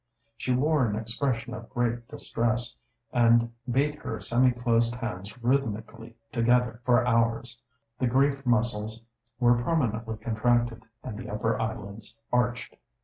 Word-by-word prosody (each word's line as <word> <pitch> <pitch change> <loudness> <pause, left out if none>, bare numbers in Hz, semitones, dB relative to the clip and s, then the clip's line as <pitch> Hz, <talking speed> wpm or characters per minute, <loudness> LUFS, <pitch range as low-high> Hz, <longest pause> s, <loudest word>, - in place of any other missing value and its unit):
She 125 - -2
wore 140 +1 +3
an 105 - -1
expression 115 +2 -2
of 115 -2 -8
great 120 -2 -1
distress, 120 +1 -2 0.4
and 115 -1 +4 0.2
beat 140 +4 +2
her - - -4
semi 125 +2 +3
closed 120 -1 +1
hands 105 -3 -6
rhythmically 115 -3 -1 0.2
together 120 -1 +2
for 125 0 +4
hours. 115 0 +1 0.4
The 130 - +2
grief 135 +3 +2
muscles 115 -2 0 0.4
were 120 -1 +4
permanently 115 -7 0
contracted, 120 0 0 0.2
and 105 - -6
the 120 - -7
upper 110 +2 -1
eyelids 110 0 -5
arched. 125 0 0
120 Hz, 130 wpm, -28 LUFS, 115-125 Hz, 0.4 s, and